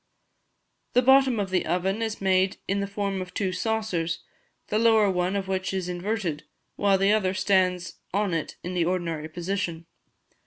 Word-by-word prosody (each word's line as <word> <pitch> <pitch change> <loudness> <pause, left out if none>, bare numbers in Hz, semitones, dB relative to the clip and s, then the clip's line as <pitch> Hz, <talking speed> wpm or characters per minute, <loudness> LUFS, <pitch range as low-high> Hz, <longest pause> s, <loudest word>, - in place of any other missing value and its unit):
The 250 - +4
bottom 265 -2 +5
of 195 -2 -2
the 185 - +2
oven, 190 +5 0
is 220 -1 -2
made 190 0 +2
in 195 +1 0
the 200 - -1
form 200 -1 -2
of 180 0 -8
two 190 -2 0
saucers, 180 -6 -1 0.5
the 215 - +1
lower 220 -3 +5
one 180 +1 0
of 195 -1 -2
which 190 0 -2
is 185 -2 -2
inverted, 180 -3 -2 0.3
while 200 -1 +3
the 195 +2 +3
other 190 -3 +1
stands 185 -2 +1
on 200 -1 0
it 165 - -3
in 180 - -4
the 175 -2 +1
ordinary 165 -3 -2
position. 170 -1 -3
190 Hz, 170 wpm, -26 LUFS, 180-205 Hz, 0.5 s, bottom